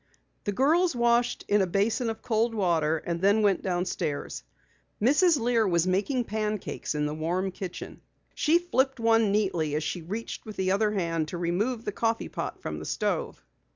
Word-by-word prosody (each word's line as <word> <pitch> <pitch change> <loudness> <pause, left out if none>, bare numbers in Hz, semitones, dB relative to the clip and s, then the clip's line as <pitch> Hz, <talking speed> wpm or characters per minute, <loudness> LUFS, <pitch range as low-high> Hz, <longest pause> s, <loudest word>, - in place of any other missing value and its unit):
The 205 - 0
girls 310 - +2
washed 240 0 +2
in 205 0 +3
a 190 - +1
basin 220 +6 +1
of 225 0 -6
cold 225 0 +1
water 165 -6 +2
and 170 +2 -4
then 205 +3 +4
went 200 -3 +3
downstairs. 175 - -2 0.6
Mrs. 295 - +4
Lear 230 -2 +2
was 170 -2 +2
baking 205 +8 +1
pancakes 215 -6 -3
in 150 0 0
the 150 - -2
warm 175 +5 -1
kitchen. 185 -1 -7 0.3
She 325 +2 +3
flipped 270 -7 0
one 225 -2 +3
neatly 180 -8 0
as 155 - -1
she 175 +3 -3
reached 210 +8 -5
with 215 -1 -9
the 185 0 0
other 210 +2 +2
hand 165 -5 -1
to 175 - -5
remove 205 +8 -1
the 210 - -1
coffee 225 +2 -1
pot - - -5
from - - -4
the - - -7
stove. - - -2
205 Hz, 180 wpm, -27 LUFS, 175-230 Hz, 0.6 s, then